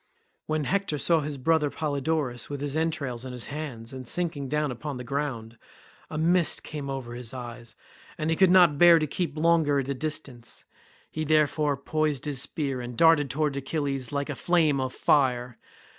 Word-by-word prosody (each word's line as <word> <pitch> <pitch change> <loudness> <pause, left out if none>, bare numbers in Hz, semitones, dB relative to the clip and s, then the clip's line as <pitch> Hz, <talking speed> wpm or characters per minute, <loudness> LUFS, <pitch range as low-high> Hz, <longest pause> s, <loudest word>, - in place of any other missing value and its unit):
When 155 -1 0
Hector 195 0 -1
saw 165 +3 +3
his 145 -1 -4
brother 150 +2 +2
Polydorus 140 -4 -2
with 145 -1 -4
his 145 0 -3
entrails 150 -7 -2
in 130 -1 -7
his 125 -1 -4
hands 130 -6 -6
and 130 -2 -7
sinking 160 -5 -2
down 150 -1 0
upon 140 +3 -5
the 125 - -6
ground, 120 -5 -4 0.5
a 155 - -5
mist 170 +2 +2
came 145 -2 -6
over 130 -3 -5
his 120 0 -6
eyes, 120 -1 -8 0.4
and 155 +1 -1
he - - +2
could 190 +2 +5
not 175 -6 +5
bear 175 -1 +8
to 155 - +1
keep 160 +1 -3
longer 160 -3 +3
at 135 -1 -2
a - - +1
distance; 135 -4 -5 0.5
he 155 - -3
therefore 150 -1 +2
poised 155 0 -1
his 140 -3 -1
spear 140 -2 -2
and 120 -1 -7
darted 160 -4 +5
towards 145 0 -1
Achilles 135 -2 -3
like 140 0 -2
a - - -4
flame 160 -3 +2
of 130 -1 -2
fire. 125 -4 +1
145 Hz, 185 wpm, -27 LUFS, 130-155 Hz, 0.5 s, bear